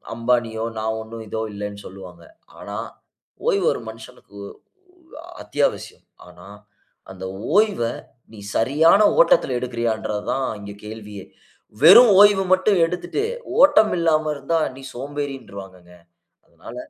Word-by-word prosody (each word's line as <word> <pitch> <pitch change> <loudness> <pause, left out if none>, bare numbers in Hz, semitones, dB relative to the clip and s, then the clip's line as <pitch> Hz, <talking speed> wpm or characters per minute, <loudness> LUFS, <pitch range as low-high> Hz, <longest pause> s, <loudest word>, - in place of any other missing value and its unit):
"அம்பானியோ, 115 -1 -1 0.2
நான் 110 0 -2
ஒன்னும் 110 0 -10
இதோ 110 +2 -4
இல்லன்னு", 100 0 -7
சொல்லுவாங்க. 90 -3 -13 0.4
ஆனா - - -7 0.7
ஓய்வு 195 -2 +1
ஒரு - - -7
மனுசனுக்கு 110 -2 -14 0.6
ஒ 325 -3 -17 0.2
அத்தியாவசியம். 145 -1 -3 0.2
ஆனா 90 +2 -15 0.6
அந்த 95 0 -9 0.3
ஓய்வ 210 - +2 0.5
நீ 105 - -12 0.2
சரியான 160 - +3 0.2
ஓட்டத்துல - - +3
எடுக்குறியான்றது 115 -4 -3
தான் 135 -1 -1
இங்க 100 0 -9
கேள்வியே. 105 -3 -9 0.6
வெறும் 205 +7 +9
ஓய்வு 205 -2 +5
மட்டும் 190 +2 +2
எடுத்துட்டு 175 - -4 0.4
ஓட்டம் 285 -7 +5
இல்லாம 155 -2 +1
இருந்தா, 150 +4 -1 0.2
நீ 135 - -12
சோம்பேறின்றுவாங்கங்க. 120 -10 -8 0.5
அதனால - - -13
125 Hz, 115 wpm, -21 LUFS, 105-170 Hz, 0.7 s, வெறும்